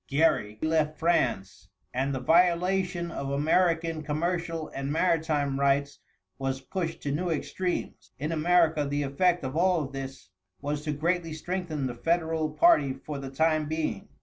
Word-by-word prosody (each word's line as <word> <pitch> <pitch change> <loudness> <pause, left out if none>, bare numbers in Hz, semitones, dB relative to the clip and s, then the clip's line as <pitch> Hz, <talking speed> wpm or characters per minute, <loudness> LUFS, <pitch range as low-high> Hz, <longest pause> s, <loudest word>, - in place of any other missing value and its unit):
Gerry 140 -8 +2
left 155 -1 +1
France, 120 - 0 0.3
and 135 +2 0
the 135 - -2
violation 175 +3 +2
of 140 -4 -4
American 165 +2 +1
commercial 165 +1 -2
and 135 +1 -4
maritime 155 -4 +1
rights 140 0 +1 0.4
was 135 0 -2
pushed 165 +3 -4
to 140 - -1
new 175 +5 -1
extremes. 180 +3 -3
In 150 +4 -3
America 165 -1 +3
the 145 +1 -1
effect 175 +5 +1
of 130 +2 -4
all 175 -1 +3
of 135 - -7
this 135 -8 -7 0.3
was 145 +1 -3
to 150 - 0
greatly 165 +2 -1
strengthen 160 -3 -3
the 125 - -2
Federal 160 +3 0
party 150 - +4
for 140 +2 -7
the 135 -1 -6
time 155 +2 +1
being. 160 +6 -3
155 Hz, 150 wpm, -28 LUFS, 140-170 Hz, 0.4 s, party